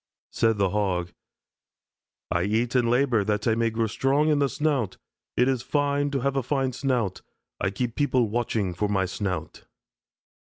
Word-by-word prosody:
Said 115 -2 +2
the 100 -2 +1
Hog: 95 -4 -1 1.2
"I 85 - +1
eat 110 +5 0
and 125 -2 +3
labor 125 -3 +3
that 105 +2 -1
I 115 - +4
may 115 0 +1
grow 115 0 0
strong 135 +7 +1
in 150 -2 +3
the 140 -1 +2
snout. 140 -11 -1 0.4
It 125 - +4
is 130 -3 +1
fine 145 +1 0
to 140 -2 -2
have 140 +1 0
a 135 - +2
fine 130 0 -1
snout. 125 -6 -1 0.4
I - - +1
keep 115 +4 -3
people 130 -5 +2
watching 110 -4 -1
for 105 +4 -1
my 95 -2 +1
snout." 95 0 -4
115 Hz, 175 wpm, -26 LUFS, 105-135 Hz, 1.2 s, I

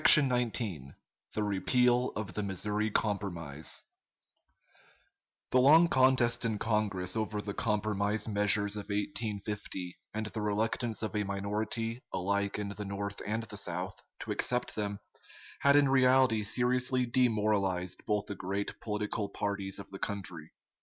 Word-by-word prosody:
] - - -13
CHAPTER 145 -4 +9 0.2
XIX 100 - -3 0.5
THE 105 - 0
REPEAL 125 +5 +2
OF 100 -3 -4
THE 105 - -2
MISSOURI 105 +2 -1
COMPROMISE 85 -9 -1 1.7
The 130 - +5
long 160 +6 +7
contest 130 -3 +3
in 110 -2 0
Congress 105 -5 0
over 110 -1 -1
the 105 -1 -4
compromise 105 -1 0
measures 105 0 +2
of 105 - -5
1850, 105 -5 -3
and 110 +1 -3
the 105 +1 -4
reluctance 110 +2 0
of 110 - -3
a 105 - +1
minority, 105 +4 -2
alike 100 +2 -1
in 105 -1 -3
the 100 +1 -6
North 100 0 -4
and 110 +2 -1
the 105 -2 -8
South, 90 +1 -4 0.2
to - - -4
accept 125 0 0
them, 100 -1 -3 0.6
had 140 0 +5
in 145 -1 +6
reality 130 -3 +4
seriously 125 +3 +2
demoralized 105 -7 +1
both 105 -1 +1
the 100 - -5
great 100 +1 -4
political 105 -1 -2
parties 100 -1 -3
of 100 - -9
the 95 - -8
country. 90 -6 -4
105 Hz, 140 wpm, -31 LUFS, 100-115 Hz, 1.7 s, CHAPTER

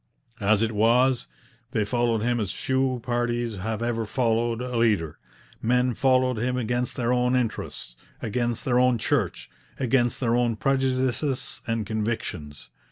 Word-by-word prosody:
As 105 +1 +3
it 115 - 0
was, 120 +4 +3 0.5
they 110 -2 +1
followed 120 -1 +1
him 120 0 +1
as 100 -4 -2
few 130 +1 0
parties 120 -2 -1
have 110 +4 -3
ever 115 -1 -1
followed 115 -1 +1
a 125 0 -4
leader. 105 -10 +1 0.4
Men 125 +1 +2
followed 130 -1 +2
him 125 +2 0
against 120 +1 -1
their 120 0 +1
own 125 0 +2
interests, 115 - -3 0.2
against 120 +1 -2
their 125 -1 +3
own 125 -1 +4
Church, 115 - -1 0.3
against 125 -2 +2
their 120 -2 +1
own 120 -2 +1
prejudices 130 +1 0
and 115 -2 -1
convictions. 90 - -4
120 Hz, 145 wpm, -25 LUFS, 110-125 Hz, 0.5 s, own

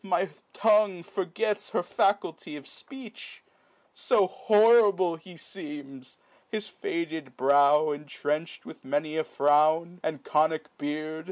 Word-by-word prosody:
My 190 -1 0 0.2
tongue 210 -4 +2
forgets 205 +4 -3
her - - -1
faculty 195 -4 -1
of 145 - -9
fpeech 260 - -11
j - - -12 0.5
So 200 - +2
horrible 210 -5 +4
he 175 +2 -15
feems! 145 -6 -10 0.3
his 215 -1 -4
faded 335 - -5
brow 145 +3 +4
Entrench'd 150 +2 -4
with - - -12
many 150 +3 -2
a 160 - 0
frown, 155 +5 +2
and 155 -4 -4
conic 155 0 0
beard. 155 +2 -4
165 Hz, 120 wpm, -27 LUFS, 150-205 Hz, 0.5 s, horrible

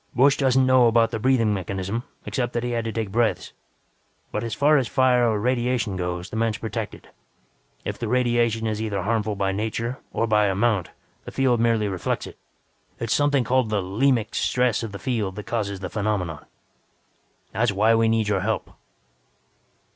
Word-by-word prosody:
Busch 135 +3 +5
doesn't 130 -1 +3
know 130 -2 +5
about 115 0 +3
the 115 - -3
breathing 115 -3 +2
mechanism, 95 +3 -3 0.2
except 120 -1 -2
that 120 - -1
he 125 - -2
had 115 -1 -1
to 115 - -2
take 110 -3 -3
breaths. 115 +1 0 0.8
But - - -2
as 115 -1 -3
far 150 +2 +4
as 130 -4 +1
fire 125 -3 +3
or 110 -2 0
radiation 120 -2 0
goes, 90 0 -4
the - - -6
man's 110 -1 0
protected. 110 -1 -6 0.8
If - - -4
the 115 - -3
radiation 120 -2 +1
is 110 -1 -2
either 100 -4 -2
harmful 110 0 0
by 95 0 0
nature 110 +5 -3
or 115 - 0
by 105 -2 +3
amount, 100 0 +1 0.4
the - - -7
field 130 -3 +2
merely 115 -2 +2
reflects 95 -3 -2
it. - - -12 0.6
It 115 -2 -3
is - - +5
something 145 -2 +2
called 125 -1 +1
the 105 -3 0
'lemic 115 +4 +1
stress' 125 -2 +1
of 115 -3 -5
the 100 - -6
field 105 -3 -2
that 105 - -7
causes 100 -4 -3
the - - -3
phenomenon. 100 -8 -2 1.0
"That's 115 +2 +1
why 105 +3 +3
we 115 0 +3
need 110 -1 +1
your 100 -2 +1
help." 110 +3 -2
115 Hz, 185 wpm, -24 LUFS, 105-120 Hz, 1.0 s, Busch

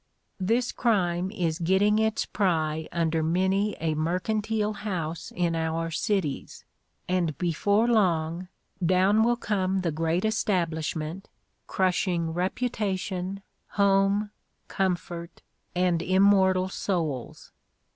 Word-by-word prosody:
This 230 +6 +1
crime 185 -5 +1
is 170 -5 -2
getting 190 +5 +3
its 220 0 +1
pry 160 -5 0
under 165 -1 0
many 190 +5 +1
a 160 -1 0
mercantile 210 +7 -1
house 170 -6 -4
in 170 -2 0
our 165 0 -1
cities, 170 -4 -2 0.4
and 175 -5 0
before 200 +6 +1
long 180 -6 +1 0.4
down 185 +5 +4
will 240 +1 +3
come 195 -4 -1
the 170 -3 -1
great 165 +4 0
establishment, 170 -5 -1 0.4
crushing 180 -3 0
reputation, 190 -1 -2 0.3
home, 200 +1 +3 0.4
comfort, 175 -3 -3 0.3
and 175 -2 +2
immortal 190 0 +4
souls. 165 - -3
185 Hz, 100 wpm, -27 LUFS, 165-200 Hz, 0.4 s, down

